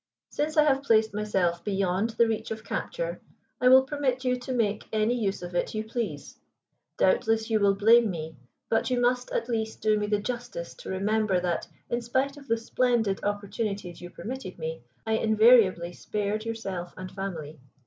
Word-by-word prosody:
Since 310 Hz, +1 st, -2 dB
I 305 Hz, -, +7 dB
have 275 Hz, -2 st, +3 dB
placed 220 Hz, -5 st, +3 dB
myself 190 Hz, -5 st, 0 dB
beyond 195 Hz, +1 st, 0 dB
the 235 Hz, -, +5 dB
reach 220 Hz, -1 st, -2 dB
of 220 Hz, 0 st, -5 dB
capture, -, -, -4 dB, 0.4 s
I 250 Hz, -, +4 dB
will 260 Hz, +1 st, +8 dB
permit 265 Hz, -2 st, -1 dB
you 250 Hz, 0 st, +2 dB
to 250 Hz, +1 st, -6 dB
make 215 Hz, -4 st, 0 dB
any 220 Hz, +2 st, +2 dB
use 205 Hz, -6 st, -1 dB
of 175 Hz, 0 st, -7 dB
it 175 Hz, -, -1 dB
you 215 Hz, -, -1 dB
please. 220 Hz, -, -5 dB, 0.6 s
Doubtless 220 Hz, +4 st, +2 dB
you 220 Hz, -, +3 dB
will 200 Hz, -1 st, +4 dB
blame 225 Hz, +3 st, +5 dB
me, 160 Hz, -3 st, -5 dB, 0.3 s
but 225 Hz, -, +1 dB
you 250 Hz, -1 st, +1 dB
must 245 Hz, +1 st, +1 dB
at 230 Hz, -, -2 dB
least 220 Hz, -2 st, -2 dB
do 215 Hz, -1 st, +3 dB
me 210 Hz, -, -1 dB
the 210 Hz, 0 st, +2 dB
justice 235 Hz, -5 st, -5 dB
to -, -, -10 dB
remember 200 Hz, 0 st, +1 dB
that, 175 Hz, -2 st, -1 dB, 0.2 s
in 240 Hz, 0 st, -1 dB
spite 260 Hz, +4 st, 0 dB
of 280 Hz, -1 st, -13 dB
the 230 Hz, -, +2 dB
splendid 230 Hz, -3 st, 0 dB
opportunities 205 Hz, -3 st, -3 dB
you 175 Hz, -, -8 dB
permitted 235 Hz, -2 st, -7 dB
me, 160 Hz, -3 st, -5 dB, 0.2 s
I 220 Hz, 0 st, +1 dB
invariably 215 Hz, -6 st, +5 dB
spared 210 Hz, +3 st, -3 dB
yourself 195 Hz, -6 st, -5 dB
and 185 Hz, 0 st, -7 dB
family. 165 Hz, -6 st, -6 dB
220 Hz, 180 wpm, -27 LUFS, 195-240 Hz, 0.6 s, will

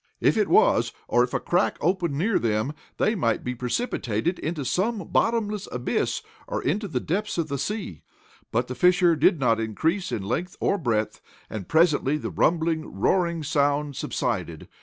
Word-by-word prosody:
If -, -, +3 dB
it -, -, +2 dB
was, -, -, +4 dB
or 120 Hz, -, +4 dB
if 125 Hz, -, -2 dB
a -, -, 0 dB
crack 180 Hz, +3 st, +1 dB
opened 170 Hz, -3 st, 0 dB
near 200 Hz, +6 st, +2 dB
them, 110 Hz, +4 st, 0 dB, 0.2 s
they 215 Hz, -, +2 dB
might 115 Hz, -, 0 dB
be 125 Hz, -, -2 dB
precipitated 125 Hz, -, -2 dB
into 155 Hz, -3 st, -3 dB
some 200 Hz, -, -1 dB
bottomless 215 Hz, -3 st, 0 dB
abyss, 125 Hz, -1 st, -1 dB, 0.2 s
or -, -, -2 dB
into 200 Hz, +9 st, 0 dB
the 140 Hz, -9 st, -2 dB
depths 180 Hz, +10 st, -2 dB
of 165 Hz, -2 st, -1 dB
the 140 Hz, -1 st, -2 dB
sea. 195 Hz, -, -4 dB, 0.5 s
But 120 Hz, +2 st, 0 dB
the 125 Hz, -, -4 dB
fissure 180 Hz, +2 st, +4 dB
did 165 Hz, +2 st, +3 dB
not 115 Hz, -4 st, +2 dB
increase 160 Hz, -, -1 dB
in 100 Hz, -, -2 dB
length 170 Hz, -, -3 dB
or 200 Hz, -, +1 dB
breadth, 110 Hz, -7 st, -1 dB, 0.3 s
and, 105 Hz, -4 st, -5 dB
presently 155 Hz, -3 st, +3 dB
the -, -, -5 dB
rumbling, 160 Hz, -, 0 dB
roaring 170 Hz, -, +1 dB
sound 145 Hz, -1 st, +1 dB
subsided. 105 Hz, -, -3 dB
155 Hz, 170 wpm, -25 LUFS, 125-180 Hz, 0.5 s, was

